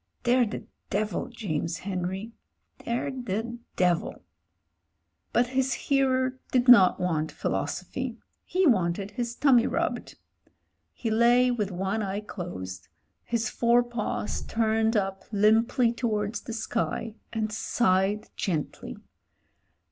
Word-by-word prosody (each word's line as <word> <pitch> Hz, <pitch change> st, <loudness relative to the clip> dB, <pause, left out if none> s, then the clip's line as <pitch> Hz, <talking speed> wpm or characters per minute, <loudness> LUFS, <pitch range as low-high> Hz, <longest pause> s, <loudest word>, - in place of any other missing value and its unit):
They're 245 Hz, 0 st, +4 dB
the 205 Hz, -, -5 dB, 0.3 s
devil, 210 Hz, +1 st, -1 dB
James 170 Hz, -, -3 dB
Henry 190 Hz, +3 st, -4 dB, 0.3 s
— -, -, -46 dB
^they're 250 Hz, +2 st, -3 dB
the 235 Hz, +3 st, -3 dB, 0.2 s
devil." 180 Hz, -2 st, 0 dB, 1.1 s
But 240 Hz, 0 st, +2 dB
his 265 Hz, 0 st, +1 dB
hearer 260 Hz, -2 st, +1 dB
did 250 Hz, 0 st, +2 dB
not 200 Hz, -7 st, +8 dB
want 160 Hz, -3 st, 0 dB
philosophy; -, -, -3 dB, 0.3 s
he 370 Hz, +1 st, +1 dB
wanted 195 Hz, -, +2 dB
his 235 Hz, +2 st, -3 dB
tummy 255 Hz, -4 st, +4 dB
rubbed. -, -, -2 dB, 0.8 s
He 225 Hz, -, -3 dB
lay 240 Hz, +3 st, +5 dB
with 210 Hz, -5 st, -1 dB
one 195 Hz, +4 st, -2 dB
eye 200 Hz, 0 st, -2 dB
closed, 95 Hz, -, -7 dB, 0.4 s
his 230 Hz, -1 st, -1 dB
four 240 Hz, +1 st, +3 dB
paws 240 Hz, -3 st, -3 dB
turned 220 Hz, 0 st, +1 dB
up 195 Hz, -1 st, -2 dB
limply 225 Hz, +3 st, +3 dB
towards 220 Hz, -2 st, -1 dB
the 230 Hz, -, -7 dB
sky, 225 Hz, -1 st, -2 dB, 0.2 s
and 215 Hz, -2 st, -2 dB
sighed 205 Hz, -2 st, +1 dB
gently. 160 Hz, -6 st, -3 dB
220 Hz, 115 wpm, -27 LUFS, 195-240 Hz, 1.1 s, not